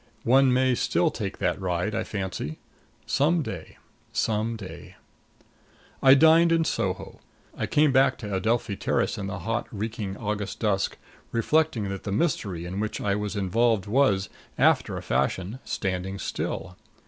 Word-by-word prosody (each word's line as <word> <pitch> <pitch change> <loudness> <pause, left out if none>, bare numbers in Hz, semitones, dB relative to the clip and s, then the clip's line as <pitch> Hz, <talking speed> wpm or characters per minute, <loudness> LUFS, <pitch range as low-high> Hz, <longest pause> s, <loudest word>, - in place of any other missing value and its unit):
One 130 +2 +5
may 130 0 +3
still - - +1
take - - -4
that - - -1
ride, 90 +3 -1
I 110 - -1
fancy. 95 -8 -4 0.5
Some 155 +4 +2
day 90 - -7 0.3
some 110 +1 0
day 100 -4 -10 1.1
I 135 0 +8
dined 160 +3 +6
in 165 0 +3
Soho. - - -2 0.4
I - - -2
came 150 -1 +3
back 130 0 +4
to 105 -4 -6
Adelphi 110 +1 0
Terrace - - 0
in 100 - -3
the 95 -1 -4
hot, 115 +1 -1
reeking 105 -2 -4
August 105 -2 -3
dusk, 100 -3 0 0.3
reflecting 120 -3 +1
that 95 -1 -4
the 100 - -5
mystery 100 - -1
in 90 +3 -4
which 110 +1 -2
I 100 - 0
was 105 0 -3
involved 105 +2 +1
was, 105 -4 +2 0.3
after - - +3
a - - -6
fashion, 95 +7 -1
standing 95 0 -2
still. 90 -2 -4
105 Hz, 150 wpm, -26 LUFS, 95-130 Hz, 1.1 s, I